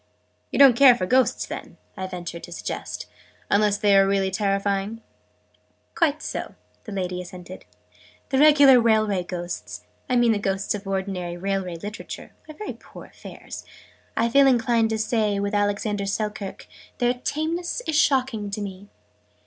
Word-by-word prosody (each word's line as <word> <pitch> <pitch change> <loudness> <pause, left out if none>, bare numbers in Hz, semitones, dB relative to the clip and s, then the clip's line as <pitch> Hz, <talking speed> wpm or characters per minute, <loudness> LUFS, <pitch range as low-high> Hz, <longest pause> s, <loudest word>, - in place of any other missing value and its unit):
"You - - -3
don't 275 -4 +8
care 255 -1 +8
for 185 - -2
Ghosts, 255 +5 +2
then," - - -8 0.2
I 190 -1 -4
ventured 175 -2 -7
to - - -15
suggest, - - -5 0.5
"unless 205 0 +3
they 205 -1 +3
are 195 0 +6
really 195 -1 +1
terrifying?" 200 +2 -1 0.9
"Quite 310 -2 +1
so," - - -5 0.3
the 220 - -8
lady 180 -2 -3
assented. 180 0 -10 0.6
"The 265 - +1
regular 285 -4 +7
Railway 215 -4 +2
Ghosts 175 0 -6 0.3
I 250 - +2
mean 240 -1 +4
the 210 - +1
Ghosts 195 0 -1
of 205 -1 -6
ordinary 190 -3 -3
Railway 190 -1 -2
literature 205 +6 -8 0.2
are 310 - -9
very 425 - -6
poor - - -13
affairs. - - -10 0.5
I 230 - +3
feel 275 +3 +5
inclined 240 -3 +3
to 220 - -1
say, 215 -2 0
with 200 +1 -2
Alexander 205 0 0
Selkirk, 210 -1 -4 0.3
'Their 245 -1 +2
tameness 335 +9 -2
is 315 - -1
shocking 260 -8 +2
to 200 - -4
me'! 200 0 -7
205 Hz, 155 wpm, -24 LUFS, 195-245 Hz, 0.9 s, don't